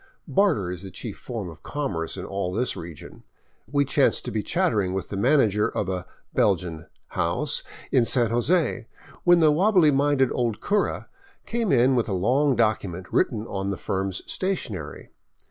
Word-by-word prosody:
Barter 165 - +2
is 90 - -6
the 95 - -8
chief 100 +3 -7
form 115 -6 -6
of 80 -1 -11
commerce 95 - -3
in - - -5
all 100 -2 -3
this 115 +6 0
region. 85 -4 -10 0.5
We 140 -1 +2
chanced 140 +1 +2
to 125 - -3
be 110 - -1
chattering 105 - 0
with 95 - -4
the - - -4
manager 105 -2 +3
of 100 - -2
a 90 -1 -3
" - - -44
Belgian 85 -5 0
" - - -47
house 95 - 0 0.3
in 125 -4 +4
San 120 -2 +2
Jose, 120 -1 +1 0.4
when 175 -1 +6
the 155 -1 +6
wobbly 180 -1 +4
minded 140 -2 +2
old 120 -4 -1
cura 205 0 0 0.4
came 235 -3 -1
in 130 0 +4
with 120 -2 0
a - - -1
long 130 +9 +2
document 100 -5 -1
written 110 -1 +1
on 100 -3 -3
the 100 - -2
firm's 95 -1 -3
stationery. 115 - -4
115 Hz, 175 wpm, -25 LUFS, 95-145 Hz, 0.5 s, when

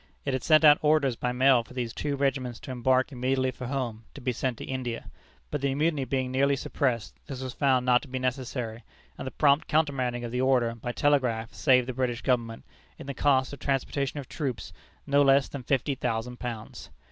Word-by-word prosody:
It 140 - -1
had 130 - -2
sent 155 -1 +5
out 150 -1 +8
orders 150 -4 +3
by 125 +2 -2
mail 130 0 +4
for 120 +3 -15
these 120 -3 -3
two 145 +2 -2
regiments 135 -4 -1
to - - -7
embark 130 +2 +2
immediately 130 0 0
for 125 0 -7
home, 120 -4 -3
to - - -8
be 125 0 0
sent 125 0 -2
to - - -7
India. 125 -3 -4 0.4
But 150 - -2
the 140 -1 0
mutiny 150 -2 +1
being 130 -2 -1
nearly 140 +2 +2
suppressed, 125 -4 -1
this 130 -2 -6
was 130 0 -5
found 130 -3 +2
not 125 -1 +4
to - - -11
be 130 0 -4
necessary, 125 -3 -3 0.3
and - - -7
the - - -1
prompt 145 0 +3
countermanding 130 -6 0
of 120 - -5
the 125 +1 -1
order 125 -3 +2
by 115 +1 -5
telegraph 125 -5 +1
saved 125 -3 +3
the 130 - -3
British 120 -1 -2
Government, 115 -3 0 0.3
in - - -9
the 140 - -4
cost 135 -1 +2
of 140 - -8
transportation 140 +1 -1
of 135 - -8
troops, 135 -7 -4 0.3
not 140 0 +4
less 135 0 +4
than 140 - -7
fifty 135 +2 0
thousand 125 -1 -3
pounds. 115 -3 -7
130 Hz, 210 wpm, -27 LUFS, 125-140 Hz, 0.4 s, out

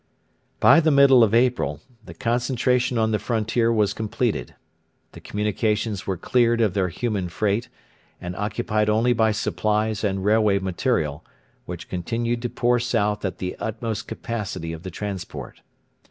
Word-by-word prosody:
By - - +7
the 160 -1 +3
middle 140 -4 +6
of 110 0 +3
April 120 - +1 0.2
the - - -11
concentration 125 +1 0
on 110 -1 +2
the 105 - +1
frontier 115 0 0
was 105 -3 +2
completed. 110 - -2 0.6
The - - -12
communications 105 0 -1
were 95 -2 -1
cleared 120 +4 +2
of 110 -5 +2
their 95 -1 +1
human 100 0 -2
freight, 105 +5 -1 0.5
and 90 0 -6
occupied 105 +1 -1
only 115 +3 +3
by 110 -2 +2
supplies 110 0 -1
and 95 -2 -1
railway 105 -1 +3
material, 95 - -1 0.4
which 90 -1 -7
continued 115 +6 -2
to 120 - -2
pour 120 +1 +1
south 105 -3 0
at 95 - -3
the 90 0 -4
utmost 110 -1 -4
capacity 95 -8 -4
of 80 - -8
the 95 - -6
transport. 95 -1 -6
110 Hz, 150 wpm, -23 LUFS, 100-120 Hz, 0.6 s, By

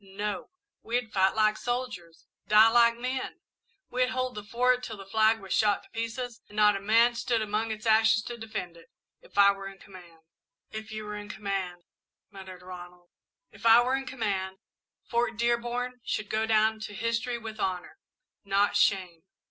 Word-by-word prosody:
No! 200 +1 -5 0.3
We'd 235 -1 -2
fight 190 0 +3
like 215 -1 +3
soldiers, 240 -10 -5 0.2
die 215 +1 +7
like 235 0 +4
men; 255 +2 -4 0.5
we'd 250 0 +1
hold 255 -1 -2
the 210 - -7
Fort 250 +4 +1
till 220 -3 -6
the 195 - -10
flag 220 +2 +3
was 195 -2 -5
shot 210 -2 +2
to - - -22
pieces 230 +1 -5
and 205 - -14
not 210 -1 +5
a - - -2
man 225 +4 +4
stood 235 0 0
among 215 +2 -1
its 220 +1 -5
ashes 220 0 +4
to 240 - -6
defend 215 -7 -6
it, 165 - -17 0.3
if - - -18
I 200 0 +7
were 195 0 -7
in 195 0 -10
command!" 175 -4 -15 0.5
"If 220 0 -7
you 215 0 -6
were 210 0 -5
in 205 0 -9
command 195 -4 -4 0.2
" - - -60
muttered 190 -2 -11
Ronald. 180 -1 -11 0.4
"If - - -16
I 230 +1 +7
were 255 +2 +1
in 270 0 -4
command, 195 -7 -2 0.5
Fort 235 -1 0
Dearborn 240 +1 -1
should 215 -3 -3
go 220 +1 0
down 220 0 +3
to 215 -1 -7
history 230 +3 -1
with 220 -2 -8
honour, 185 - -3 0.4
not 200 +1 +1
shame. 185 -5 +1
215 Hz, 180 wpm, -28 LUFS, 195-235 Hz, 0.5 s, die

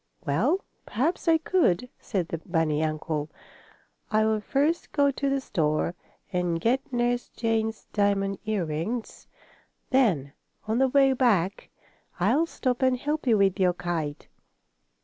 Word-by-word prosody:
"Well, 240 - +1 0.2
perhaps 310 - -1
I 325 -1 +6
could," 315 - +1
said 185 -6 -2
the 165 - -3
bunny 160 -2 0
uncle. 155 -1 -2 0.8
"I 215 0 +3
will 220 -1 +1
first 290 +9 0
go 285 -1 +3
to 275 +1 -1
the 275 0 +1
store 160 - 0 0.4
and 175 -2 0
get 250 +8 0
Nurse 245 0 0
Jane's 225 -1 -1
diamond 200 -1 +1
earrings. 210 +2 -3 0.6
Then, 180 - +2 0.3
on 220 +2 +1
the 265 - +4
way 270 0 +4
back, 205 -8 +1 0.5
I'll 250 - +3
stop 255 -5 -2
and 260 -1 +3
help 295 +2 -3
you 225 -3 +5
with 195 -1 +2
your 180 -1 +3
kite. 170 -4 -4
220 Hz, 135 wpm, -26 LUFS, 175-260 Hz, 0.8 s, I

